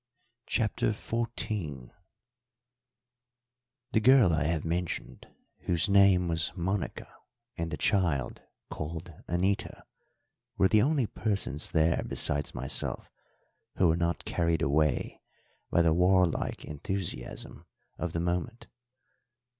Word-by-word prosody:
CHAPTER 110 -1 0
XIV 105 - -4 2.0
The 110 - +3
girl 120 -6 +6
I 80 -2 +1
have 80 0 -1
mentioned, 85 +1 -3 0.4
whose 85 +3 +1
name 100 -3 +5
was 80 -2 0
Monica, 95 +2 -2 0.5
and 85 0 -3
the - - -4
child, 85 - 0 0.3
called 80 +2 -6
Anita, 95 +3 -1 0.7
were 95 - +4
the 110 - +5
only 140 -1 +2
persons 100 -9 -2
there 80 0 +2
besides 75 0 -1
myself 65 +4 -3 0.6
who 90 - +4
were 80 - +3
not 85 0 -1
carried 85 -2 0
away 75 0 +1 0.5
by 85 - +3
the 80 -1 +4
warlike 90 0 +2
enthusiasm 80 -1 -5 0.3
of 90 -2 -3
the 85 - -1
moment. 90 +8 -2
85 Hz, 105 wpm, -29 LUFS, 80-100 Hz, 2.0 s, girl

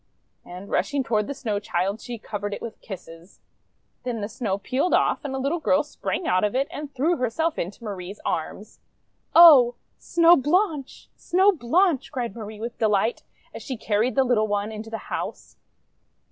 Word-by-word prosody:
And 180 +3 -10
rushing 285 -3 0
toward 215 -3 0
the 280 - -4
Snow 220 -7 -2
Child 200 +1 -2
she 240 -1 -6
covered 205 -1 -5
it - - -10
with 230 -1 -8
kisses. 175 -3 -11 0.6
Then 245 -3 -3
the 205 - -3
Snow 215 -3 -3
peeled 260 - 0
off, - - +1
and 275 -2 -4
a - - -2
little 280 +6 -1
girl 295 -1 +2
sprang 300 +3 -4
out 185 +2 +2
of 210 +3 0
it 270 +2 +1
and 295 -1 -7
threw 310 +6 +1
herself 310 +7 -1
into 195 +7 -5
Marie's 195 -2 -6
arms. - - -4 0.6
"Oh! 280 -8 +9 0.2
Snow 340 0 +5
Blanche! 300 -1 0
Snow 380 +3 +3
Blanche!' 335 0 +1
cried 240 -6 -4
Marie 215 -2 -8
with 235 +2 -6
delight 215 +1 +1 0.3
as - - -8
she 260 - -5
carried 220 +3 0
the 270 - +4
little 235 -4 +2
one 205 +1 -1
into 220 +1 -7
the 225 - -4 0.2
house. - - -5
235 Hz, 175 wpm, -24 LUFS, 205-285 Hz, 0.6 s, Oh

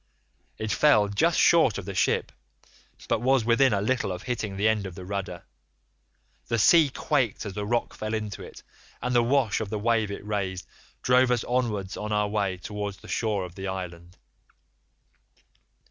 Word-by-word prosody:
It 110 -1 -3
fell 105 -9 +4
just 160 +12 +2
short 160 - +5
of 100 - -6
the 100 - -5
ship, 95 - +1 0.8
but 110 - 0
was 130 -2 +2
within 120 +3 +4
a 100 -1 +1
little 125 -3 0
of 90 +1 -6
hitting 110 -5 -3
the 105 +2 +2
end 105 -3 +1
of 90 - -9
the 90 - -9
rudder. 95 -2 -5 1.0
The 115 - 0
sea 155 - +6
quaked 130 -5 -1
as 100 - -5
the 105 +1 -4
rock 120 +1 -1
fell 110 +1 -3
into 105 -3 -5
it, - - -11 0.4
and 125 - -2
the 120 - +5
wash 120 -3 +1
of 110 - -4
the 110 - -2
wave 110 0 +1
it 100 0 -7
raised 100 -3 -3 0.4
drove 125 0 +4
us 120 -2 +1
onwards 110 -6 -2
on 105 0 -4
our 105 0 +1
way 100 -3 -1
towards 105 +1 -5
the - - -15
shore 105 -5 -1
of 90 - -11
the 95 +2 -6
island. 90 -2 -7
105 Hz, 180 wpm, -26 LUFS, 100-120 Hz, 1.0 s, sea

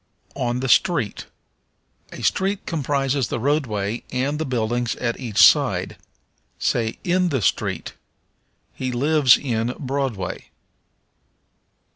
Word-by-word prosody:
On 125 -2 -1
the 135 - -1
Street. 135 - +1 0.8
A - - -9
street 195 +1 0
comprises 140 -4 -1
the - - -3
roadway 120 -6 -1
and 135 +4 -1
the 160 - -2
buildings 120 -1 -1
at 120 -2 -3
each 115 -6 -6
side. - - +5 0.6
Say, 115 -2 -1
in 180 0 +1
the 135 -8 -1
street. - - -1 0.8
He 130 -1 -3
lives 140 +1 +4
in 120 -2 -2
Broadway. 135 -8 -3
130 Hz, 110 wpm, -22 LUFS, 120-145 Hz, 0.8 s, side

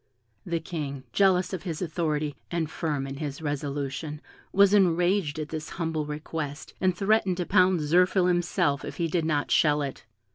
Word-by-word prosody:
The 170 -1 0
King, 145 -5 -5
jealous 185 +1 +3
of 185 - -3
his 165 -5 -4
authority, 155 -4 -1
and 165 -3 -2
firm 150 -5 -2
in 135 0 -6
his 145 -1 -4
resolution, 145 0 -3 0.3
was 200 0 +5
enraged 180 -3 +3
at 155 -1 -4
this 155 -1 -5
humble 160 -3 -2
request, 150 -1 -5
and 185 -1 +2
threatened 195 -2 +2
to 180 - -1
pound 180 -1 +4
Zirphil 180 +4 +3
himself 175 -5 +1
if - - -7
he 170 -2 0
did 165 0 0
not 150 -2 0
shell 150 -2 +4
it. 135 -4 -6
160 Hz, 170 wpm, -27 LUFS, 150-180 Hz, 0.3 s, was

